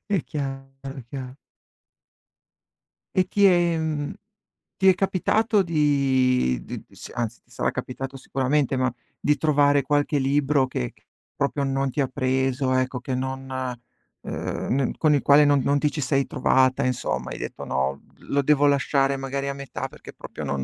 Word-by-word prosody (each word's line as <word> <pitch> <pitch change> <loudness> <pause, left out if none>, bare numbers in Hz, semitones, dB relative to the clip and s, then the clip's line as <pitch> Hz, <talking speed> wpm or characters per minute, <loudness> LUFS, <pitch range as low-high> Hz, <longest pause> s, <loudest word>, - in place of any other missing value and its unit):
È 200 -6 +1
chiaro, 135 -2 -5 0.2
è 135 - -7
chiar 130 -2 -6 1.8
E 185 - +5
ti 200 +1 +3
è 175 -3 +4
mhmm, 155 -2 -2 0.6
ti 190 - +3
è 185 - +7
capitato 200 +3 +2
di 135 - +2
di - - -7
s - - -11
anzi 120 -1 -3
ti - - -32
sarà - - -1
capitato 135 +1 -5
sicuramente, 135 +1 0
ma 130 -1 +1 0.3
di 150 - +2
trovare 145 -2 +3
qualche 145 +2 +1
libro 140 0 +2
che 60 - -3
che - - -30 0.3
proprio 140 0 -1
non 135 0 0
ti 145 - -1
ha 135 - +1
preso, 130 +1 0
ecco, 130 0 0
che 130 +1 -3
non, 130 +1 -4 0.7
ehm, - - -3 0.2
n - - -4
con 155 -2 +3
il 145 - +2
quale 145 +1 +6
non 145 -1 +4
non 140 +2 +2
ti 150 0 +1
ci 150 - -3
sei 135 0 +1
trovata, 130 +1 +2
insomma. 65 - -2
Hai - - -5
detto: - - -6
"No, 65 +1 -1 0.2
lo 140 - 0
devo 145 0 +3
lasciare 140 -1 +2
magari 135 +1 -3
a - - -2
metà 140 0 -5
perché - - -13
proprio - - -8
non 70 -1 -2
135 Hz, 170 wpm, -24 LUFS, 130-145 Hz, 1.8 s, è